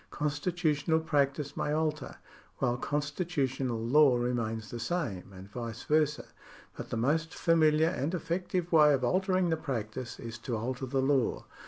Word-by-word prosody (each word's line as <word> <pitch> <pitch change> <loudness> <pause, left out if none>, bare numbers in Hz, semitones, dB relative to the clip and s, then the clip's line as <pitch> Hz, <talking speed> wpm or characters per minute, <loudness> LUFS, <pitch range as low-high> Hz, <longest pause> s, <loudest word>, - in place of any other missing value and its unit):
Constitutional 150 +1 0
practice 145 -2 0
may 150 - -1
alter, 155 0 -1 0.4
while 120 -2 +1
constitutional 145 -3 -1
law 130 +3 +5
remains 115 -3 -2
the 120 - -5
same, 115 - -3
and 95 0 -11
vice 115 +1 -6
versa, 150 -1 +1 0.5
but - - -7
the - - -2
most 155 +7 0
familiar 160 -1 +4
and 165 0 -2
effective 175 +1 -2
way 150 -3 +6
of 130 - -4
altering 185 +4 +2
the 160 - +1
practice 120 -4 -4
is 115 0 -7
to 115 0 -3
alter 130 +4 -3
the 135 +1 0
law. 135 -3 +1
145 Hz, 150 wpm, -30 LUFS, 120-160 Hz, 0.5 s, way